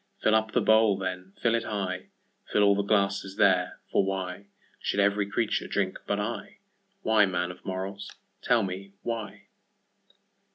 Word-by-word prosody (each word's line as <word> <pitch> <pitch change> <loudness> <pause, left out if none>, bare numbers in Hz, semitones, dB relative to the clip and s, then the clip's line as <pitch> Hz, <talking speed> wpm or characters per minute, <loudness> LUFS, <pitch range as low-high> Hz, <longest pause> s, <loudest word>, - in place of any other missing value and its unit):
Fill 110 - +4
up 110 0 +2
the - - +3
bowl, 110 -2 +5
then, 95 -1 -4
fill 115 - +3
it 115 -1 +1
high, 95 -4 -3 0.4
Fill 105 - +4
all 100 0 +6
the 100 - +1
glasses 100 -1 0
there—for 95 -1 +2
whyShould 95 +1 -5
every 100 0 +2
creature 110 +2 0
drink 95 -2 -1
but 100 - 0
I?Why, 195 - -1
man 90 -1 -1
of 90 - -14
morals, 95 +1 -5 0.3
tell 120 -3 +3
me 95 +1 -5
why? 115 -3 -4
100 Hz, 140 wpm, -28 LUFS, 95-110 Hz, 0.4 s, all